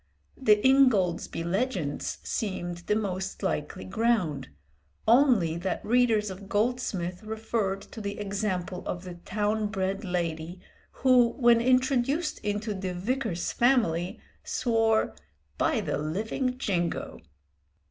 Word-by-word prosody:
The 210 -5 +5
'Ingoldsby 220 -12 +3
Legends' 180 - -2
seemed 175 -5 -3
the 210 - +2
most 190 -3 -3
likely 150 0 -2
ground, 190 - 0 0.6
only 230 - +4
that 180 +1 -3
readers 225 -3 +3
of 195 +1 -10
Goldsmith 205 -5 -1
referred 215 -2 -2
to 220 - -10
the 200 0 -4
example 195 -3 -2
of 180 - -4
the 180 -1 -7
town 210 +4 -1
bred 195 0 -2
lady 170 -2 -3 0.5
who, 245 -2 +6
when 235 -2 +4
introduced 255 +5 +2
into 210 +1 -2
the 190 -2 -4
Vicar's 215 -2 -2
family, 220 -9 +2 0.2
swore 225 -2 +1 0.5
"by - - +2
the - - -2
living 220 - -2
Jingo!" 175 -9 -2
205 Hz, 115 wpm, -28 LUFS, 180-235 Hz, 0.6 s, who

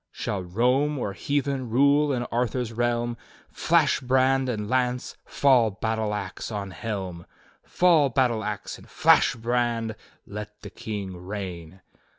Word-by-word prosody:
"'Shall 100 -2 -3
Rome 125 +11 +1
or 100 -6 -3
Heathen 140 -2 -2
rule 140 +4 +4
in 125 -3 -1
Arthur's 120 0 -1
reahn.^ 120 0 -1 0.3
Flash - - +2
brand 130 +1 +2
and 105 -4 -3
lance, 125 0 -1
fall 130 -5 +3
battle 110 +1 -2
ax 100 +2 -5
on 100 -2 -4
helm. 95 -4 -5 0.3
Fall 165 -6 +3
battle 120 -3 +1
ax, 105 -1 -5
and - - -17
flash - - +4
brand! 115 -1 -1 0.3
Let 105 +1 -8
the 105 - -8
King 100 -4 -5
reign! 90 -2 -7
115 Hz, 135 wpm, -25 LUFS, 105-130 Hz, 0.3 s, rule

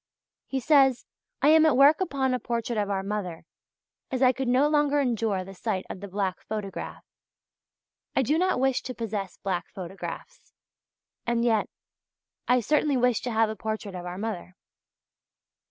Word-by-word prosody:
He 270 - -2
says: 270 -2 +4 0.4
"I 290 - +6
am 315 0 +7
at 295 - +3
work 290 +5 +6
upon 270 -7 0
a 250 - 0
portrait 235 -1 -2
of 205 -1 -1
our 195 -1 -1
mother; 195 -5 -4 0.6
as 260 0 0
I 255 - +7
could 265 0 -3
no 255 +4 +4
longer 295 -1 +2
endure 225 -7 0
the 195 +1 -10
sight 190 -1 -3
of - - -7
the 200 - -7
black 195 -1 -2
photograph. 210 -3 -6 1.1
I 265 - +3
do 300 +6 +1
not 370 -6 +2
wish 265 -1 +2
to 255 - -6
possess 210 -4 -4
black 180 -3 -3
photographs, 190 0 -8 0.7
and 235 0 +1
yet 220 -3 +2 0.8
I 250 0 +4
certainly 295 +3 +2
wish 250 -2 +2
to 245 - -3
have 220 -1 +2
a - - -5
portrait 215 -1 -4
of 180 -1 -6
our 180 +1 -5
mother." 195 -4 -5
230 Hz, 170 wpm, -27 LUFS, 200-265 Hz, 1.1 s, am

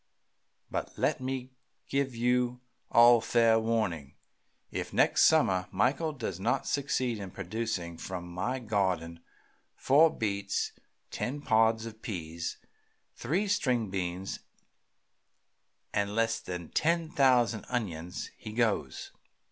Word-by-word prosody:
But - - -4
let - - +1
me 130 0 -4 0.4
give 135 -2 -1
you 125 +1 +1 0.3
all 120 -1 +7
fair 115 -1 +4
warning. 110 -11 -1 0.6
If - - -4
next - - +4
summer 90 -1 +3
Michael 135 - +1
does 100 - -5
not 110 +6 0
succeed 130 -5 -1
in 100 -2 -6
producing 95 -3 -4
from 90 -2 -5
my 90 +9 -2
garden 95 -8 -1 0.6
four 155 +5 +5
beets, 100 -6 -2 0.4
ten 135 +4 -3
pods 110 -3 +3
of 110 -1 -9
peas, 85 -5 -5 0.6
three 190 +7 -1
string 125 - +1
beans, 95 0 -3 1.5
and 100 0 0
less 115 0 +1
than 90 -2 -6
ten 165 0 +1
thousand 125 - +3
onions, 90 -8 -4
he 110 - -9
goes. 115 -2 -1
115 Hz, 115 wpm, -30 LUFS, 95-125 Hz, 1.5 s, all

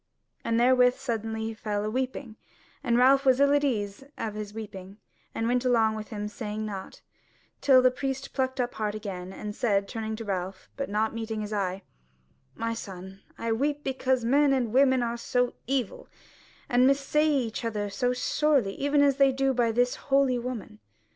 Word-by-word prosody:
And 230 0 +1
therewith 250 0 +5
suddenly 225 -4 -3
he 225 0 -3
fell 210 -2 -3
a - - -1
weeping; 255 -1 -3 0.5
and 240 -3 +2
Ralph 270 +2 +5
was 260 -1 +4
ill 280 0 +5
at 290 0 +3
ease 210 -5 -1
of 220 -2 -3
his 210 -1 -6
weeping, 200 -3 -9 0.4
and 225 - -1
went 245 +1 +1
along 225 -3 +3
by 215 - -4
him 210 -1 -5
saying 210 0 -5
nought; 195 -3 -7 0.6
till 260 -2 +6
the 255 - +5
priest 270 +1 -4
plucked 260 -1 -1
up 245 -1 -1
heart 210 -1 -2
again, 190 -4 -6
and 210 +2 -6
said, 200 -5 +1
turning 220 +1 -4
to 225 +1 -7
Ralph, 190 -1 -4
but 275 - -4
not 215 +2 0
meeting 225 -1 -4
his 210 0 -5
eye: 195 -1 -2 0.7
"My 230 0 -2
son, 190 -3 -8 0.2
I 230 - -2
weep 290 +5 0
because 260 -2 0
men 280 +3 +4
and 240 -4 0
women 260 -1 +4
are 235 0 -2
so 245 +1 0
evil, 260 -5 -2 0.6
and 250 -2 +4
mis 275 +1 +4
say 300 +3 +1
each 250 -6 -1
other 210 -3 -2
so 245 +5 0
sorely, 250 -4 +1
even 285 +1 +2
as 280 -2 +3
they 275 -1 +5
do 270 0 +1
by 235 -2 +2
this 245 +2 +2 0.2
holy 270 -2 +3
woman." 235 -3 -6
235 Hz, 185 wpm, -27 LUFS, 215-265 Hz, 0.7 s, till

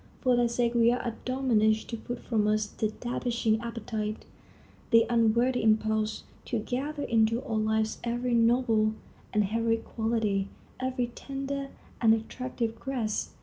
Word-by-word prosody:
For 255 -2 +3
their 240 0 +3
sake 235 0 +1
we 235 0 +5
are 245 - 0
admonished 230 -3 +1
to - - -1
put 245 +2 -6
from 215 -3 +1
us 215 0 +2
the 215 +1 -2
debasing 235 -2 0
appetite, 220 -2 -4 0.6
the 230 -1 +6
unworthy 235 +2 +3
impulse; 220 0 +1 0.2
to 240 - -1
gather 280 +7 -3
into 230 +1 +2
our 220 - -2
lives 220 0 0
every 240 +1 -1
noble 230 -2 +3 0.4
and 210 - +3
heroic 225 +2 0
quality, 220 -4 0 0.3
every 255 -2 -1
tender 275 +1 -4 0.3
and 225 -1 +6
attractive 230 0 -4
grace. 235 -6 -2
230 Hz, 140 wpm, -28 LUFS, 220-245 Hz, 0.6 s, the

